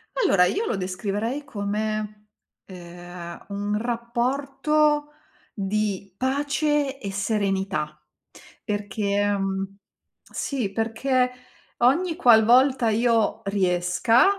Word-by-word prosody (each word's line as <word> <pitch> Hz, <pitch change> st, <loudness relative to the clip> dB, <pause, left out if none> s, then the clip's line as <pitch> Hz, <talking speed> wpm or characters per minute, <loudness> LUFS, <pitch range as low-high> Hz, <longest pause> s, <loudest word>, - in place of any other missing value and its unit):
Allora, 190 Hz, -, +4 dB
io 430 Hz, -, 0 dB
lo -, -, -1 dB
descriverei 205 Hz, +8 st, -3 dB
come, 210 Hz, -2 st, -3 dB, 0.4 s
ehm, 175 Hz, -1 st, -10 dB
un 205 Hz, +1 st, -2 dB
rapporto 275 Hz, +6 st, 0 dB, 0.4 s
di 200 Hz, -1 st, -2 dB
pace 285 Hz, +1 st, 0 dB
e 200 Hz, -, -5 dB
serenità. 195 Hz, -6 st, -1 dB, 0.6 s
Perché, 205 Hz, -1 st, -1 dB
mhmm, 195 Hz, 0 st, -3 dB, 0.5 s
sì, 250 Hz, -8 st, -3 dB
perché 250 Hz, +4 st, 0 dB, 0.5 s
ogni 320 Hz, +8 st, +3 dB
qualvolta 245 Hz, -2 st, +5 dB
io 230 Hz, 0 st, +2 dB
riesca, 185 Hz, +3 st, +3 dB
215 Hz, 85 wpm, -24 LUFS, 195-255 Hz, 0.6 s, qualvolta